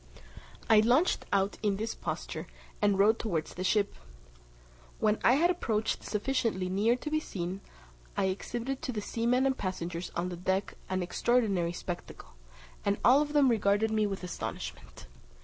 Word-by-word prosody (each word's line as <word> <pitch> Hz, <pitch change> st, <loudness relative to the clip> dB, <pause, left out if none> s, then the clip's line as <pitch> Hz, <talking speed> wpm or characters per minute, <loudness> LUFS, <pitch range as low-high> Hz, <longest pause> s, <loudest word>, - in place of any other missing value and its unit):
I 220 Hz, -1 st, +7 dB
launched 250 Hz, +11 st, +3 dB
out 195 Hz, 0 st, +1 dB
in 205 Hz, -2 st, +1 dB
this 220 Hz, +2 st, -2 dB
posture, -, -, -5 dB, 0.3 s
and 205 Hz, -2 st, +3 dB
rowed 215 Hz, +3 st, +4 dB
towards 170 Hz, -8 st, -2 dB
the 185 Hz, -, -4 dB
ship. 200 Hz, +1 st, +2 dB, 1.0 s
When 215 Hz, 0 st, +2 dB
I 245 Hz, -, +6 dB
had 340 Hz, +6 st, +4 dB
approached 220 Hz, -11 st, -1 dB
sufficiently 210 Hz, -4 st, -1 dB
near 210 Hz, +6 st, +3 dB
to 300 Hz, +4 st, -6 dB
be 310 Hz, -, +2 dB
seen, 185 Hz, -, -5 dB, 0.6 s
I -, -, +2 dB
exhibited 240 Hz, +7 st, -3 dB
to 310 Hz, -5 st, -3 dB
the 215 Hz, -3 st, -3 dB
seamen 240 Hz, +4 st, +1 dB
and 265 Hz, -1 st, +2 dB
passengers 175 Hz, -3 st, -4 dB
on 175 Hz, +1 st, -1 dB
the 175 Hz, -, -6 dB
deck 190 Hz, +2 st, -1 dB, 0.2 s
an 185 Hz, -1 st, 0 dB
extraordinary 195 Hz, -3 st, +1 dB
spectacle, 175 Hz, 0 st, -7 dB, 0.5 s
and 200 Hz, 0 st, +1 dB
all 265 Hz, +4 st, +7 dB
of 295 Hz, 0 st, -2 dB
them 290 Hz, -2 st, +5 dB
regarded 215 Hz, -2 st, +2 dB
me 215 Hz, -1 st, +2 dB
with 195 Hz, -2 st, -5 dB
astonishment. 180 Hz, -, -6 dB
210 Hz, 160 wpm, -30 LUFS, 190-245 Hz, 1.0 s, I